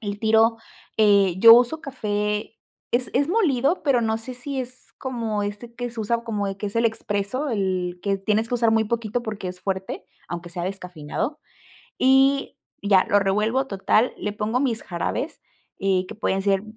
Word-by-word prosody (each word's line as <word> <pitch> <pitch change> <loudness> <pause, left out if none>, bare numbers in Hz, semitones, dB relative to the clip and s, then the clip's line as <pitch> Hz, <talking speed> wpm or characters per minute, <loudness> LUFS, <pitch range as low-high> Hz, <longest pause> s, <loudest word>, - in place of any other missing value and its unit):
El 205 -2 -4
tiro, 225 +1 +4 0.4
eh, 200 -4 +5
yo 230 +3 +10
uso 245 +7 +3
café, 210 -6 -3 0.3
es 245 +1 0
es 275 +2 +3
molido, 330 - +2
pero 270 -5 +3
no 220 0 0
sé 250 +3 -8
si 265 +2 -4
es 255 0 -9
como 230 -5 -2
este 205 +4 -6
que 245 0 -4
se 230 - -12
usa 230 +2 0
como, 210 -3 -2
eh, 195 0 -4
que 210 - -3
es 200 - -5
el 230 - +2
expreso, 220 +4 -1
el 185 -5 -1
que 200 -1 +1
tienes 215 +3 0
que 245 - -1
usar 230 -2 +3
muy 225 0 +3
poquito 230 +1 -2
porque 210 -5 -5
es 180 0 -8
fuerte, 190 -1 -4 0.2
aunque 175 0 -6
sea 175 0 -4
descafeinado, 180 - -4 0.6
y 270 +1 +3 0.3
ya, 195 -2 +4
lo 205 - +5
revuelvo, 210 +7 +1
total, 215 +3 +2
le 210 - -3
pongo 220 +3 -1
mis 245 -4 -1
jarabes, 185 - -3 0.4
eh, 190 -1 +1
que - - -8
pueden 195 -2 0
ser 195 0 +1
220 Hz, 180 wpm, -23 LUFS, 200-245 Hz, 0.6 s, yo